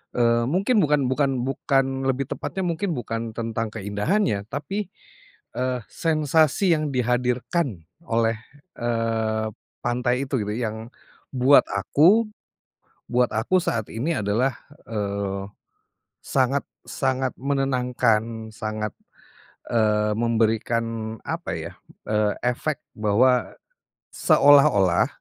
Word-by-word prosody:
eee, 115 -1 +3
mungkin 200 - +2
bukan 150 -4 +3
bukan 135 -3 +1
bukan 135 0 0
lebih 135 +1 -1
tepatnya, 190 - -3
mungkin 175 0 -1
bukan 115 -1 -4
tentang 115 -1 -2
keindahannya, 105 - 0
tapi, 190 - -4 0.7
eee, 125 0 -1
sensasi 160 +3 +2
yang 155 0 -1
dihadirkan 125 - 0 0.2
oleh, 115 -1 +1 0.4
eee, 115 -2 0 0.4
pantai 125 +2 0
itu, 130 -3 -1
gitu, 105 - -3
yang 110 -1 -4 0.5
buat 130 +3 +6
aku, 165 - +4 0.9
buat 125 0 +2
aku 115 +13 +2
saat 115 - -2
ini 150 +9 -1
adalah, 110 +5 0 0.3
eee, 100 -2 -3 0.8
sangat 135 +1 +1 0.2
sangat 130 -1 -1
menenangkan, 125 -5 0
sangat, 110 -1 -4 0.8
eee, 105 -2 +2
memberikan 115 0 0
apa, - - -4
ya, - - -6 0.4
eee, 105 -1 +2
efek 135 +4 -1 0.2
bahwa 120 +4 +2 0.6
seolah-olah 140 - +5
120 Hz, 100 wpm, -24 LUFS, 110-140 Hz, 0.9 s, buat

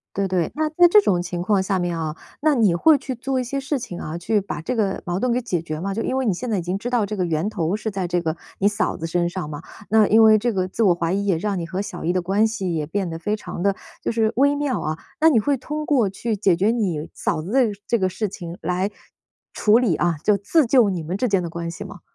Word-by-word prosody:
对 200 0 0
对， 180 -3 0
那 310 0 +1
在 350 +2 +6
这 420 - +8
种 180 - +1
情 175 0 -4
况 195 +1 +2
下 190 0 0
面 175 -1 -1
啊， 155 -1 -3 0.2
那 305 -1 +3
你 205 -7 +4
会 300 - +5
去 265 -1 -5
做 260 +2 -2
一 255 - -1
些 275 +3 -3
事 270 +1 -2
情 185 -8 -7
啊， 160 +2 -5
去 210 +4 +1
把 190 -5 -5
这 250 +10 -3
个 205 -4 0
矛 175 +2 -1
盾 250 -1 +1
给 250 - +1
解 180 -8 -2
决 155 -2 -5
吗？ 195 +3 -3
就 225 - -2
因 260 - -1
为 265 -2 0
你 195 - +2
现 250 +6 -5
在 210 - +1
已 175 - -2
经 180 +3 -2
知 240 +5 -4
道 235 -5 +1
这 210 - -4
个 185 - 0
源 165 +3 -1
头 180 -2 -1
是 220 -1 -4
在 190 -2 -2
这 175 0 +1
个 160 -1 -2 0.2
你 195 - +1
嫂 210 +1 0
子 165 - -4
身 175 +1 0
上 175 -4 -5
嘛， 150 +1 -7 0.3
那 215 -1 +4
因 220 +1 +6
为 220 0 +7
这 235 +2 0
个 185 -2 0
自 190 +5 -2
我 185 -4 +5
怀 170 0 -1
疑 200 +1 0
也 190 - +2
让 205 +1 -2
你 - - -3
和 185 +3 -4
小 180 -5 -6
姨 175 - +1
的 185 - +1
关 195 +5 +2
系 190 -6 -3
也 155 -2 -2
变 190 +3 -2
得 165 0 -6
非 210 +3 -1
常 180 -4 -7
地， 200 -1 +2 0.3
就 - - -1
是 225 -1 +1
微 285 +3 +3
妙 285 -3 -1
啊， 155 +1 -3 0.2
那 320 - +6
你 270 -8 +4
会 280 +5 +1
通 300 +4 -5
过 240 -10 +2
去 225 +3 -3
解 190 -4 +3
决 200 +5 +2
你 180 -10 -1
嫂 - - -1
子 180 +8 -6
的 270 - +4
呃， 245 - +4 0.2
这 235 - +2
个 185 - +1
事 205 +3 -2
情 175 -3 -8
来 180 +4 -1 0.6
处 215 +1 +4
理 235 -9 +2
啊， 170 +1 +1
就 210 - +4
自 260 - +2
救 235 -3 +5
你 175 -3 -3
们 180 +4 -3
之 250 +5 0
间 195 -3 +2
的 170 - -4
关 170 0 -4
系 - - -7
吗？ - - -10
195 Hz, 315 characters per minute, -22 LUFS, 175-230 Hz, 0.6 s, 这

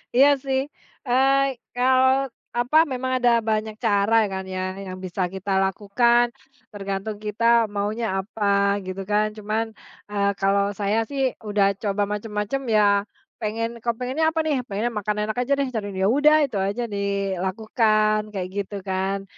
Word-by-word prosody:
Iya 270 +3 +7 0.2
sih, 265 -1 0 0.5
eee, 270 +2 +3 0.2
kalau 260 +2 +3 0.2
apa, 245 +5 +1
memang 260 0 -2
ada 245 - +6
banyak 215 -1 -1
cara 210 -1 +2 0.2
kan 190 0 -3
ya, - - -2 0.2
yang 185 -1 -7
bisa 185 0 -5
kita 195 +1 -5
lakukan, 235 +5 +2 0.5
tergantung 200 +1 -4
kita 210 +2 -4 0.3
maunya 210 +3 -1
apa 205 +2 -4 0.4
gitu 185 +1 -5
kan. 210 +1 +2
Cuman, 215 +2 -2 0.4
eee, 200 -1 +1
kalau 200 +1 +2
saya 205 +1 0
sih 280 -1 -3 0.2
udah 205 -2 +2
coba 205 -1 0
macam-macam 210 +4 -3
ya, 215 -2 +4 0.6
pengen 230 +2 -3
kepengennya 250 +6 -1
apa - - +1
nih? 300 -4 0
Pengennya 210 +4 -2
makan 210 -1 -2
enak 215 +1 -3
aja 250 +3 +1
deh, 280 -1 -1 0.4
ya - - +4
udah 300 +3 +5
itu 255 -8 -2
saja 200 +5 -1
dilakukan, 200 +2 +1 0.2
kayak 185 -2 -2
gitu 200 +1 -4
kan. 190 +1 -2
215 Hz, 145 wpm, -23 LUFS, 200-245 Hz, 0.6 s, Iya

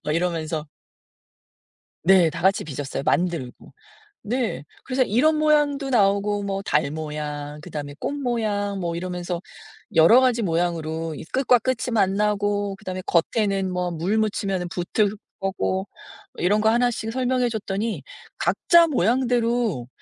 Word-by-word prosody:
막 150 - -1
이러면서. 160 -3 -2 1.3
네. 175 -3 +5
다 - - -6
같이 190 +2 +3
빚었어요 140 -2 -5
만들고. 170 -8 -1 0.5
네. 235 - -2 0.2
그래서 260 0 +1
이런 255 +8 +3
모양도 295 -2 +2
나오고 205 -2 +2
뭐 195 -1 -2
달 150 -6 +1
모양 150 -1 -5
그다음에 150 -4 -6
꽃 - - -3
모양 215 -7 -1
뭐 170 -2 -2
이러면서 180 0 -4 0.5
여러 170 +10 +7
가지 245 -3 +2
모양으로 165 -2 -1
이 - - -8
끝과 255 -1 +4
끝이 255 -1 -1
만나고 205 0 +1
그다음에 185 -3 -6
겉에는 195 +2 +1
뭐 180 0 -1
물 175 +6 -1
묻히면은 200 -4 -1
붙을 200 +4 0 0.2
거고 190 0 -1 0.5
이런 205 +4 +2
거 220 - +3
하나씩 235 -1 +1
설명해 255 0 +1
줬더니 215 0 -3 0.4
"각자 340 -1 +4
모양대로 235 - +1
195 Hz, 285 characters per minute, -23 LUFS, 170-230 Hz, 1.3 s, 여러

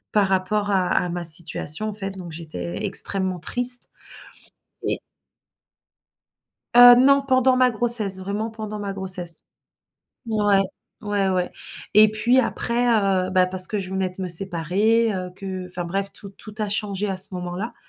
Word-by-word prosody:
par 205 -2 +2
rapport 205 +2 -1
à 185 -2 +1
à 180 - 0
ma 175 0 -5
situation, 165 +4 +3
en - - -4
fait 195 -2 -5
donc 180 -3 -10
j'étais 90 - -7
extrêmement 190 -3 +1
triste. 245 +5 +4 1.1
Et - - -2 1.8
Heu, 245 0 +10
non, 275 +2 +4
pendant 260 -1 +2
ma 255 -1 +3
grossesse, 220 -4 +1
vraiment, 205 +4 -4
pendant 215 -1 -7
ma 200 -1 -5
grossesse. 180 -3 -5 0.9
Ouais, 205 -3 +2 0.4
ouais 205 -2 -1
ouais, 180 -1 -1 0.4
et 215 +1 +6
puis 235 +4 +1
après, 240 0 -1 0.4
heu, - - -6
bah, 185 -1 +2
parce 185 0 +3
que 215 - -4
je 185 -1 -6
venais 190 -1 -2
de 185 +1 -9
me 180 - -4
séparer, 195 +6 +1
heu, 185 -1 -5
que 190 -2 -7
enfin 180 -1 -4
bref, 195 +3 -3
tout 200 - -10
tout 210 +1 -13
a 210 -1 -2
changé 205 0 -3
à 190 - -3
ce 185 0 -4
moment-là, 180 +6 -6
195 Hz, 160 wpm, -22 LUFS, 185-215 Hz, 1.8 s, Heu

